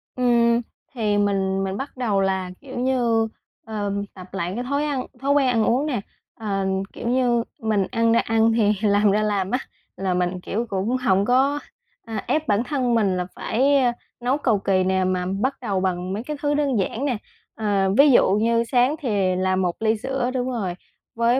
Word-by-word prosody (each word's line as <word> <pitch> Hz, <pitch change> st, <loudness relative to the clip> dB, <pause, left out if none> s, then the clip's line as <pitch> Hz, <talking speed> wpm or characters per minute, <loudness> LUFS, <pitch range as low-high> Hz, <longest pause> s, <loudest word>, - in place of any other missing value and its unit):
Ừm, 235 Hz, -1 st, +3 dB, 0.3 s
thì 215 Hz, -5 st, 0 dB
mình 195 Hz, -1 st, +1 dB
mình 190 Hz, +1 st, -3 dB
bắt 270 Hz, -1 st, -6 dB
đầu 210 Hz, -6 st, +1 dB
là, 190 Hz, -1 st, -1 dB
kiểu 265 Hz, -3 st, -7 dB
như, 240 Hz, -3 st, +2 dB, 0.4 s
ờ, 205 Hz, -2 st, -3 dB, 0.2 s
tập 185 Hz, -1 st, -11 dB
lại 180 Hz, -2 st, -2 dB
cái 245 Hz, -, -3 dB
thói 280 Hz, +3 st, -1 dB
ăn 275 Hz, -4 st, -2 dB, 0.2 s
thói 280 Hz, +1 st, +1 dB
quen 285 Hz, -2 st, +4 dB
ăn 230 Hz, -3 st, +2 dB
uống 260 Hz, +5 st, +2 dB
nè, 250 Hz, -9 st, -1 dB, 0.3 s
ờ, 195 Hz, -3 st, -2 dB, 0.3 s
kiểu -, -, -6 dB
như, 245 Hz, -1 st, +2 dB, 0.2 s
mình 215 Hz, -4 st, +1 dB
ăn 230 Hz, -1 st, +2 dB
ra -, -, +4 dB
ăn 225 Hz, 0 st, +2 dB
thì 215 Hz, -2 st, +3 dB
làm 205 Hz, 0 st, +4 dB
ra 210 Hz, +2 st, +2 dB
làm 200 Hz, -3 st, 0 dB
á. 250 Hz, -, +1 dB, 0.4 s
Là 190 Hz, -1 st, -1 dB
mình, 180 Hz, 0 st, -1 dB
kiểu, 225 Hz, +6 st, -2 dB
cũng 205 Hz, +5 st, 0 dB
hổng 200 Hz, -6 st, +2 dB
có, 270 Hz, +5 st, +2 dB, 0.5 s
à, 225 Hz, -3 st, -4 dB
ép 310 Hz, 0 st, 0 dB
bản 210 Hz, +3 st, +2 dB
thân 255 Hz, -4 st, 0 dB
mình 200 Hz, -5 st, +2 dB
là 180 Hz, -, -1 dB
phải, 275 Hz, +5 st, +2 dB
ơ, 250 Hz, -3 st, +3 dB, 0.3 s
nấu 250 Hz, +3 st, +1 dB
cầu 235 Hz, -8 st, +1 dB
kì 190 Hz, -1 st, +1 dB
nè 190 Hz, 0 st, +1 dB
mà 185 Hz, -1 st, 0 dB, 0.2 s
bắt 270 Hz, +1 st, 0 dB
đầu 200 Hz, -5 st, -1 dB
bằng 185 Hz, 0 st, -2 dB
mấy 215 Hz, -, -3 dB
cái 300 Hz, +3 st, -5 dB
thứ 290 Hz, 0 st, +1 dB
đơn 285 Hz, -6 st, +1 dB
giản 225 Hz, +8 st, -2 dB
nè. 250 Hz, -5 st, 0 dB, 0.4 s
Ờ, 200 Hz, -3 st, +1 dB
ví 280 Hz, 0 st, +7 dB
dụ -, -, +5 dB
như 230 Hz, +3 st, +2 dB
sáng 250 Hz, +4 st, +2 dB
thì 200 Hz, -, 0 dB
làm 185 Hz, 0 st, +1 dB
một 175 Hz, -2 st, 0 dB
ly 220 Hz, 0 st, +2 dB
sữa, 260 Hz, +1 st, -2 dB
đúng 255 Hz, 0 st, -1 dB
rồi, 200 Hz, -8 st, -2 dB, 0.4 s
với 235 Hz, +2 st, +2 dB
225 Hz, 205 wpm, -23 LUFS, 195-255 Hz, 0.5 s, ví